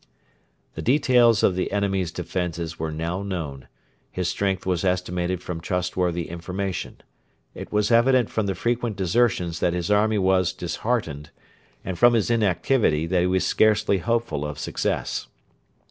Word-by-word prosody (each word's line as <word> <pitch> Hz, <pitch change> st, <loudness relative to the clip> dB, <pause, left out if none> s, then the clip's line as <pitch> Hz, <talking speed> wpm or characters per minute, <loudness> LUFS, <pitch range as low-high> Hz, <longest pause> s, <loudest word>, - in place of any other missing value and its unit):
The -, -, -6 dB
details 125 Hz, -4 st, +4 dB
of 95 Hz, -, +4 dB
the 90 Hz, -, -2 dB
enemy's 95 Hz, -3 st, 0 dB
defences 85 Hz, -2 st, -4 dB
were 80 Hz, 0 st, -2 dB
now 85 Hz, +4 st, -3 dB
known; 80 Hz, -9 st, -5 dB, 0.4 s
his 90 Hz, -2 st, -3 dB
strength 95 Hz, -2 st, -1 dB
was 90 Hz, -1 st, 0 dB
estimated 90 Hz, -1 st, -1 dB
from 85 Hz, -2 st, -5 dB
trustworthy 90 Hz, -2 st, -1 dB
information. 90 Hz, +2 st, -5 dB, 0.5 s
It -, -, -9 dB
was 105 Hz, +1 st, +1 dB
evident 120 Hz, 0 st, +4 dB
from 110 Hz, -2 st, -1 dB
the 95 Hz, -, -1 dB
frequent 120 Hz, -2 st, -1 dB
desertions 90 Hz, -3 st, +1 dB
that 85 Hz, -, +1 dB
his 90 Hz, +1 st, -2 dB
army 105 Hz, +1 st, +3 dB
was 95 Hz, -2 st, +2 dB
disheartened, 85 Hz, -5 st, -3 dB, 0.6 s
and 90 Hz, -2 st, -4 dB
from 120 Hz, 0 st, +6 dB
his 115 Hz, +1 st, +1 dB
inactivity 100 Hz, -, +2 dB
that 90 Hz, +1 st, +1 dB
he 90 Hz, -, +2 dB
was 95 Hz, 0 st, +1 dB
scarcely 110 Hz, -2 st, +3 dB
hopeful 115 Hz, -7 st, -1 dB
of 75 Hz, -1 st, -5 dB
success. -, -, -2 dB
95 Hz, 145 wpm, -24 LUFS, 85-110 Hz, 0.6 s, from